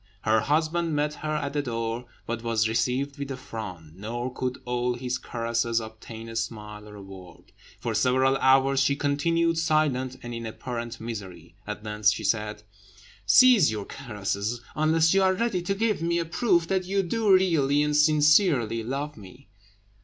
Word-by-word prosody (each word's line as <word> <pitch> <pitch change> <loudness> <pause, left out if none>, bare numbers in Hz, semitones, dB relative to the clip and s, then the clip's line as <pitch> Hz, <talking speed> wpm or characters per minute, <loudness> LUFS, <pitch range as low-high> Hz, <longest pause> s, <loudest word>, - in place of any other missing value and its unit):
Her 110 0 +3
husband 160 +4 0
met 150 +1 0
her 155 0 -2
at 140 -2 -3
the 145 - 0
door, 115 -1 -3 0.2
but 115 0 -4
was 115 -2 +1
received 130 +5 -1
with 140 -1 -4
a 135 - -4
frown, 105 - -8
nor 120 +5 -4
could 130 0 -3
all 125 0 -1
his 125 0 -3
caresses 115 0 -1
obtain 110 +1 -9
a 115 - -8
smile 105 -2 -5
or 105 - -11
a 100 - -10
word; 95 -2 -13 0.3
for 115 - -3
several 130 +4 +3
hours 135 0 +4
she 135 +1 +2
continued 165 +4 +1
silent, 145 -5 +1
and 120 0 -6
in 115 -1 -5
apparent 120 +1 -6
misery. 95 -7 -8
At 105 0 -5
length 105 -1 -2
she 105 - -2
said 105 -1 -1 0.6
"Cease 240 - +7
your 105 -2 -4
caresses, 105 -2 -4
unless 160 +2 +3
you 195 - +4
are 190 0 +3
ready 225 -4 0
to 195 +3 -2
give 215 -3 0
me 170 +1 0
a 170 - -1
proof 170 0 +1
that 190 0 0
you 195 +1 0
do 215 +3 +1
really 155 -7 +3
and 150 0 0
sincerely 150 - +4
love 140 +6 -4
me." 115 +7 -14
130 Hz, 175 wpm, -26 LUFS, 115-155 Hz, 0.6 s, Cease